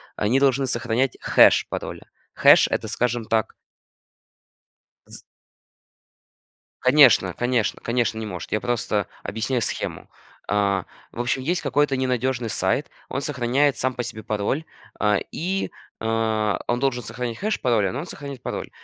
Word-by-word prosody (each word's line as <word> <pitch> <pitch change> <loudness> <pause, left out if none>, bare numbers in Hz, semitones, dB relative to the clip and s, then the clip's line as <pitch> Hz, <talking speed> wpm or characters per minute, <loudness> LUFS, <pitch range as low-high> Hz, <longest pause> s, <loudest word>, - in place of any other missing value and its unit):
Они 115 +6 +2
должны 135 -1 +3
сохранять 120 +1 0
хэш - - +5
пароля. - - -6 0.2
Хэш- - - +6
это, - - -2
скажем 120 -1 -1
так 110 -1 0 1.5
З - - -11 1.6
Конечно 125 - +6
конечно 120 -3 0
конечно, 115 -1 0
не 110 - -4
может, 90 -6 -7
я 105 - 0
просто 115 -4 -1 0.2
объясняю 115 +4 -2
схему. - - -4 0.4
А, 100 -2 +1 0.3
в - - -10
общем, 120 +2 -1
есть 175 +6 -1
какой-то 140 0 +1
ненадежный 125 -2 -1
сайт, - - 0 0.2
он 135 - -2
сохраняет 135 +1 +1
сам 130 0 -1
по 120 - -2
себе 110 -2 -6
пароль, 110 +8 -1 0.4
а, 105 -1 +3
и, 190 +3 -2 0.3
а, 110 -1 0
он 120 0 0
должен 130 -2 0
сохранять 120 -1 -5
хэш 215 +2 -1
пароля, 110 -6 +2
но 125 - -4
он 165 - -5
сохранит 140 -6 -8
пароль. - - -4
120 Hz, 140 wpm, -23 LUFS, 110-135 Hz, 1.6 s, Хэш